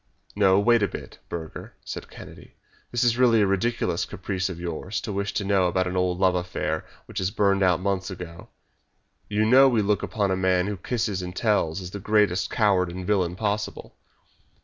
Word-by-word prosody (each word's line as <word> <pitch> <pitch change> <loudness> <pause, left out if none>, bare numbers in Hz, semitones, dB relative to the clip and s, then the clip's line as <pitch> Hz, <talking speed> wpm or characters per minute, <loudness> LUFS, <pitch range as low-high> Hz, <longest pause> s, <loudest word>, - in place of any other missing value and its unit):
"No; 95 -2 +4
wait 120 +2 +4
a 100 - +3
bit, - - -9
Burger," 80 -2 -7
said - - -7
Kennedy; - - -13 0.4
"this 120 0 +1
is 120 0 +2
really 115 -3 +5
a - - +4
ridiculous 100 +5 0
caprice 95 -1 -3
of 90 -2 -7
yours 85 +4 -4
to 105 - -5
wish 100 +1 -2
to 105 - 0
know 95 -2 +2
about 95 +1 +1
an 90 0 -3
old 90 -1 +1
love 95 -1 +3
affair 90 -3 -2 0.2
which - - -5
has 95 -1 0
burned 100 -2 +2
out 90 -2 +3
months 95 0 -1
ago. 90 -2 -9 0.8
You 105 +1 +1
know 130 +4 +7
we 115 -4 +2
look 100 0 +1
upon 100 -3 -1
a - - +2
man 95 -1 +2
who 105 0 -3
kisses 105 -1 -2
and 90 0 -6
tells 100 -6 +1
as 90 -1 -7
the 100 - -6
greatest 105 -3 +2
coward 95 -5 +2
and 90 +1 -6
villain 90 -3 +1
possible." 105 +1 -3
95 Hz, 195 wpm, -25 LUFS, 90-105 Hz, 0.8 s, know